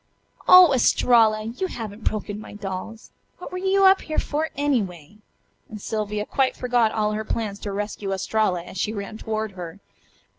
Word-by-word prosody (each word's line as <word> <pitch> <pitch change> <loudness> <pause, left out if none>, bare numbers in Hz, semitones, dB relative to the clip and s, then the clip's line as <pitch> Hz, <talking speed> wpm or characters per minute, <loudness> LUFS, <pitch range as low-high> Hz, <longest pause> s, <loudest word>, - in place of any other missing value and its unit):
"Oh, 365 -5 +9
Estralla! 225 -3 +4
You 235 - -3
haven't 220 - -7
broken 210 -1 -2
my 215 - -10
dolls! 205 +2 -7 0.3
What 360 - -9
were 365 - -4
you 385 +1 +3
up 385 0 +6
here 310 - -5
for, 310 +2 -1
anyway?" 210 - -2 0.5
and 215 - -8
Sylvia 210 0 -3
quite 265 +2 0
forgot 245 -3 +2
all 210 -1 0
her 215 +1 -3
plans 210 -2 -3
to 205 - -5
rescue 205 0 -4
Estralla 190 -2 0
as 180 - -9
she 215 - -1
ran 205 +1 -6
toward 220 -1 -3
her. 180 -1 -9
215 Hz, 170 wpm, -23 LUFS, 205-245 Hz, 0.5 s, Oh